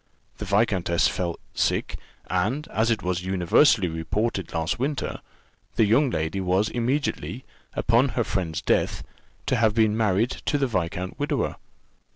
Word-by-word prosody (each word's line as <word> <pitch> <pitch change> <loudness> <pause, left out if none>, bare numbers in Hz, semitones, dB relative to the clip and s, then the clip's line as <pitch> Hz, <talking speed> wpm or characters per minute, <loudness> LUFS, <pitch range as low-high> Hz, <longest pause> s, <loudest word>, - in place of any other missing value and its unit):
The 105 - -4
viscountess 95 -4 +2
fell 85 -2 -2 0.2
sick, - - 0 0.3
and, 110 +12 -1
as 110 +2 +1
it 110 -4 0
was 90 0 -1
universally 95 - +3
reported 90 +4 -2
last 80 +6 -1
winter, 140 +2 -2 0.6
the 110 - +4
young 130 +7 +3
lady 80 -1 -2
was 95 +4 +1
immediately, 125 +1 -2 0.3
upon 120 +4 +3
her 120 - +3
friend's 90 -7 -2
death, - - +1 0.4
to - - +1
have 110 -1 +3
been 110 -2 +3
married 110 +1 +2
to 145 - -1
the 140 - +1
viscount 90 -5 -3
widower. - - -1
105 Hz, 145 wpm, -25 LUFS, 90-120 Hz, 0.6 s, the